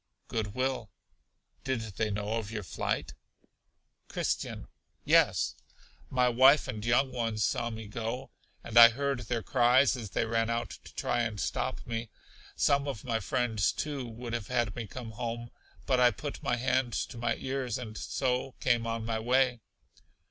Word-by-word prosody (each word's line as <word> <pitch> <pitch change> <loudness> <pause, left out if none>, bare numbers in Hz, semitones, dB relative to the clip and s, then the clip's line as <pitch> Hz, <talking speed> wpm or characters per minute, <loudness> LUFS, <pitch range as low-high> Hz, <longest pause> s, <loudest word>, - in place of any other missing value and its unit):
Good 105 -3 -3
will. 130 -4 -1 0.7
Did 130 -3 -1
they 110 0 -2
know 105 +1 -2
of 110 -3 -4
your 110 -2 -4
flight? - - -2 0.9
Christian. - - -2 0.4
Yes, - - +4 0.6
my 125 -1 +3
wife 130 +4 +6
and 105 0 -5
young 125 +3 +3
ones 115 -4 -1
saw 120 +3 0
me 110 -1 -7
go, 115 +4 -4 0.3
and 115 +1 +4
I 115 0 +12
heard 140 +2 -1
their 115 -1 -3
cries 130 +2 +4
as 115 -5 -6
they 115 - 0
ran 115 0 0
out 115 -1 -1
to - - -12
try 120 - 0
and 110 -3 -2
stop - - -2
me. 115 -1 -4 0.5
Some 140 0 +2
of 135 -7 -4
my 115 -3 0
friends, 110 -1 +1
too, 140 -4 -4
would 115 +1 -7
have 115 -4 -3
had 120 -5 0
me 115 -3 -5
come 115 +2 -7
home, 120 +1 -5 0.3
but 130 -2 +2
I 125 -1 +7
put 145 +3 -6
my 120 - +1
hands 125 -1 0
to 120 - -10
my 115 -1 0
ears, 130 -3 -2
and 115 -4 -7
so 130 +2 -1
came 120 -2 +2
on 115 -1 -2
my 115 -1 -1
way. 125 +1 +2
120 Hz, 170 wpm, -30 LUFS, 110-125 Hz, 0.9 s, I